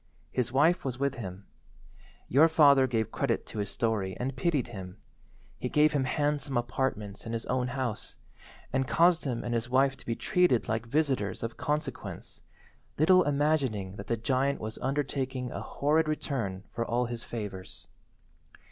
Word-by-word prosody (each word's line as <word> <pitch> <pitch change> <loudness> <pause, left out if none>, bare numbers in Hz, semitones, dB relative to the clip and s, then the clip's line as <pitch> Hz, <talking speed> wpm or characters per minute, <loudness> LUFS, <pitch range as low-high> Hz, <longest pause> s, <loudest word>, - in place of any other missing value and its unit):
His 125 -1 -1
wife 155 +7 +3
was 130 -3 -3
with 140 0 0
him. 100 -5 -7 0.8
Your 150 +6 +6
father 140 -4 +6
gave 115 -4 -1
credit - - -1
to 110 - -7
his 100 - -2
story 105 -5 -1
and 130 +1 -2
pitied 140 -3 0
him. 95 -5 -8 0.6
He - - -2
gave 150 +1 +4
him 140 -3 +1
handsome 145 -1 0
apartments 120 -4 -2
in 115 - -4
his 115 0 -3
own 125 0 0
house, 125 -4 -4 0.6
and 130 0 +1
caused 170 +5 +4
him 125 -4 -2
and 120 - -2
his 115 0 -1
wife 135 +1 +3
to - - -12
be 115 - 0
treated 180 -8 +2
like 110 +1 -2
visitors 130 -9 0
of 115 0 -4
consequence, 150 +1 -4 0.6
little 185 +5 +6
imagining 140 -10 0
that 100 - -8
the 115 - 0
giant 130 +4 0
was 110 0 -6
undertaking 135 -2 -2
a - - -5
horrid 155 +3 +1
return 115 -11 -2
for 115 - -2
all 120 +1 0
his 120 -1 -5
favours. 100 -5 -7
130 Hz, 165 wpm, -29 LUFS, 115-145 Hz, 0.8 s, Your